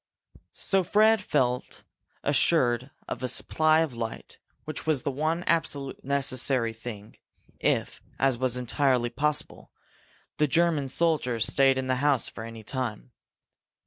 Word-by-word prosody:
So 195 -1 +1
Fred 215 +4 +4
had 205 - -14
felt 125 -3 -1 0.4
assured 130 -4 +2 0.2
of - - -5
a 130 - -1
supply 155 +4 +3
of 150 -7 -2
light, 115 -1 -7 0.3
which 155 0 -6
was 150 -5 +1
the 140 - -1
one 155 +5 -1
absolutely 140 -6 -1
necessary 130 -3 +2
thing 110 -2 -10 0.4
if, - - -1 0.2
as 135 -1 +2
was 125 0 -1
entirely 125 -1 0
possible, 150 0 -2 0.7
the 150 - +2
German 160 -1 +2
soldiers 130 -6 +1
stayed 135 -1 +3
in 130 - -2
the 130 0 0
house 140 -2 +2
for 110 - -8
any 115 -1 -9
time. 125 -1 -5
135 Hz, 140 wpm, -26 LUFS, 125-155 Hz, 0.7 s, Fred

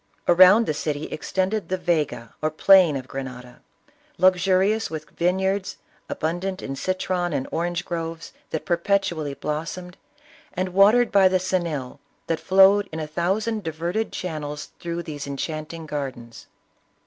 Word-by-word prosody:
Around 185 +6 +7
the 155 - -1
city 150 0 -3
extended 190 +6 -2
the 185 - 0
Yega 150 -10 -1
or 155 - +1
plain 175 0 +5
of 130 -1 -5
Grenada, 125 -2 -8 0.6
luxurious 185 +4 +3
with 155 -1 -7
vineyards, 190 +2 -1 0.3
abundant 175 +4 -3
in 135 - -4
citron 185 +1 -2
and 135 -2 -2
orange 175 +1 -2
groves 165 -1 -5 0.2
that 160 - -4
perpetually 170 -5 0
blossomed, 165 +5 -5 0.6
and 185 0 -2
watered 205 +6 +5
by 195 -1 +6
the 185 0 +2
Xenil 170 -8 -2 0.3
that 165 - -1
flowed 195 +1 +5
in 160 - -5
a 155 - -3
thousand 195 +8 -1
diverted 170 +7 -2
channels 150 -4 -5
through 170 0 -4
these 145 -3 -6
enchanting 155 +3 -5
gardens. 130 -6 -6
170 Hz, 135 wpm, -24 LUFS, 155-185 Hz, 0.6 s, Around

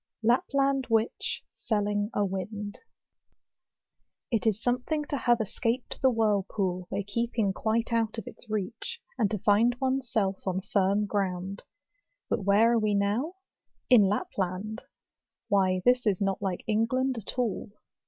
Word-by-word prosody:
Lapland 270 +3 +2
Witch 225 0 0
selling 205 -1 -1
a 205 - +2
Wind. 205 +2 -5 1.5
It 230 0 +1
is 215 -1 +2
something 250 +6 -1
to 290 - -3
have 240 -3 +2
escaped 230 +3 -2
the 265 - +5
whirlpool, 200 -5 0
by 200 - -2
keeping 220 0 0
quite 225 +3 0
out 225 -1 +1
of 225 - -5
its 230 - -12
reach; 215 - -4 0.2
and 215 -4 +3
to 215 - -1
find 220 +5 +3
one's 265 -1 -1
self 195 -3 0
on 190 0 0
firm 200 +1 +1
ground. 195 -1 -2 0.7
But 200 - 0
where 210 +4 +5
are 235 - +3
we 210 -1 +1
now? 215 - 0 0.6
In 245 -4 +9
Lapland! 195 +2 -2 0.7
why 185 -2 +2
this 250 -1 +4
is 195 -3 +2
not 195 -1 0
like 190 -3 -2
England 230 +4 +1
at 220 - -7
all. 230 -3 -1
215 Hz, 145 wpm, -28 LUFS, 200-235 Hz, 1.5 s, In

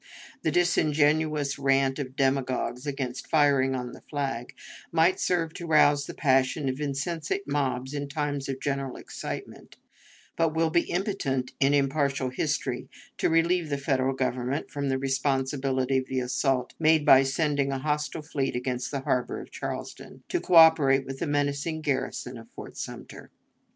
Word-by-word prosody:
The - - +1
disingenuous 155 -3 +2
rant 135 0 +2
of 130 -2 -5
demagogues 130 -1 0
about 130 -3 -3
"firing 140 -4 +2
on 125 -1 -4
the - - -12
flag" 135 -3 -3 0.4
might 165 +3 +3
serve 165 -3 0
to 170 - -7
rouse 145 -2 +4
the - - -7
passions 135 0 +2
of 130 +3 -7
insensate 150 +6 -2
mobs 135 -2 -1
in 145 -1 -3
times 145 -2 -2
of 135 -1 -3
general 135 -2 -2
excitement, - - -8 0.6
but 165 -1 +1
will 160 0 +2
be 170 +1 +1
impotent 160 -10 -2
in 140 +1 +4
impartial 140 -2 0
history 130 -2 -2 0.3
to - - +2
relieve 165 0 +2
the 140 - -1
Federal 135 -1 0
Government 130 +1 -2
from 140 -1 -2
the 130 - +1
responsibility 135 0 0
of 130 - -6
the 130 - -1
assault 125 0 0
made 155 -1 +4
by 135 - +8
sending 140 0 0
a 135 - -1
hostile 150 +2 -2
fleet 140 -4 -2
against 125 0 -2
the 140 -2 -3
harbor 130 -3 -1
of - - -11
Charleston, - - -7
to 355 - 0
coöperate 160 -6 +6
with 135 0 -7
the - - -2
menacing 145 +2 -1
garrison 140 -4 -2
of - - -14
Fort - - -10
Sumter. - - -8
140 Hz, 155 wpm, -27 LUFS, 130-155 Hz, 0.6 s, by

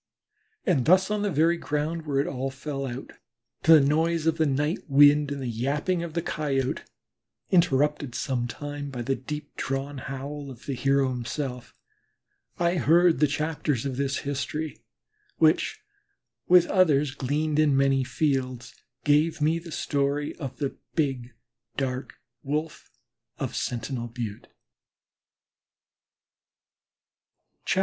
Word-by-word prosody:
And 165 - +2
thus 190 +4 +4
on 210 -1 0
the 205 - +1
very 165 +1 +3
ground 155 +1 -2
where 140 -2 +1
it 140 - +2
all 135 0 -3
fell 135 0 -5
out, 125 +2 -7 0.5
to 165 - +7
the 160 - +9
noise 160 +2 +1
of 165 0 +1
the 160 - +3
night 145 +5 0
wind 145 +1 +6
and 140 - -3
the 130 - -4
yapping 140 +10 -1
of 170 -1 -6
the 170 - 0
Coyote, 135 -5 -1 0.7
interrupted 150 -6 +2
sometimes 145 +3 -3
by 125 -3 -5
the 135 - 0
deep 150 +3 -6
drawn 135 +1 -3
howl 140 +2 -6
of 125 -2 -12
the 140 - -2
hero 135 +1 +2
himself, 125 +1 -4 0.8
I 175 +1 +1
heard 170 +4 +4
chapters 150 -4 -1
of 130 -2 -3
this 140 0 0
history 145 +2 -3 0.6
which, 160 - +3 0.7
with 180 -1 +7
others 150 -7 +3
gleaned 150 +3 -1
in 145 -3 +4
many 135 -1 +3
fields, 130 -2 -1 0.3
gave 155 +3 +3
me 155 +3 +2
the 165 0 -11
story 145 0 -1
of 135 -6 -6
the 140 -2 -3 0.2
Big 130 -6 -1 0.4
Dark 130 -1 -3 0.3
Wolf 150 +3 -3 0.5
of - - -4
Sentinel 120 0 -3
Butte. 115 -3 -6
145 Hz, 130 wpm, -26 LUFS, 135-155 Hz, 0.8 s, the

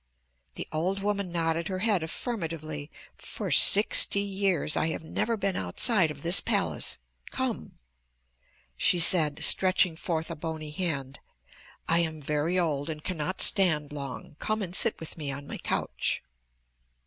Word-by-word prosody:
The - - -6
old 185 +5 -2
woman 200 -3 -2
nodded 165 -1 -1
her 185 - -3
head 205 -6 +2
affirmatively. 160 - -5 0.3
"For - - -5
sixty - - +5
years 195 -6 -1
I 155 - +1
have 160 - -4
never 225 +8 -2
been 195 -2 -1
outside 165 - +1
of 150 - -9
this 170 +3 +5
palace. - - -1 0.3
Come," 260 -3 -4 1.0
she 175 - +2
said, 160 -3 +5
stretching 185 -2 +4
forth 165 0 -3
a - - -4
bony 155 -1 -6
hand. 150 -6 -3 0.7
"I 165 - +2
am 160 -2 -2
very 150 +4 -1
old 155 -4 -1
and 155 -1 -6
cannot 185 +1 -2
stand 155 -7 +4
long. 140 0 -8
Come 215 -1 -2
and 180 -1 -5
sit 230 - +1
with 160 0 -9
me 145 -3 -3
on 140 +1 -7
my - - -7
couch." - - -2
165 Hz, 150 wpm, -27 LUFS, 150-190 Hz, 1.0 s, sixty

